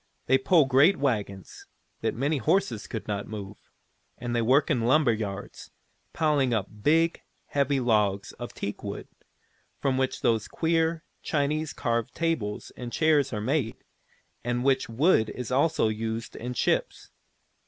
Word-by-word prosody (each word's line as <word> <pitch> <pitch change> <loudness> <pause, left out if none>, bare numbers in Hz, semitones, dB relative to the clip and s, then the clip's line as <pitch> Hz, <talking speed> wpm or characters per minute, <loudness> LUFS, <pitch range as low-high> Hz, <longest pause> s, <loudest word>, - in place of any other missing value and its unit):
They 130 +1 +4
pull 155 +3 +4
great 140 +8 +5
wagons, 105 - -3 0.3
that - - -1
many 140 +4 0
horses 130 - 0
could 110 - -6
not 100 -1 -3
move, 105 -2 -9 0.5
and 120 -1 -3
they 120 - +2
work 130 +6 +3
in 120 - +1
lumber 125 +1 +4
yards, 100 -2 -6 0.4
piling 145 -6 +2
up 105 -4 0
the - - -17
big, 165 +6 +2 0.3
heavy 140 -1 +1
logs 105 -5 +1
of - - -6
teakwood, - - -6 0.7
from 130 -1 0
which 130 0 -1
those 115 -3 +1
queer, 165 0 0 0.2
Chinese 150 +1 -1
carved 115 -3 -2
tables 160 -12 -2
and 120 -1 -7
chairs 150 -3 +2
are 105 -3 -3
made, 130 -1 0 0.7
and 120 +1 -1
which 135 -2 +2
wood 115 -2 +3
is 125 -1 -6
also 140 0 +2
used 110 +1 -3
in 125 +2 -5
ships. - - -1
125 Hz, 145 wpm, -27 LUFS, 110-150 Hz, 0.7 s, great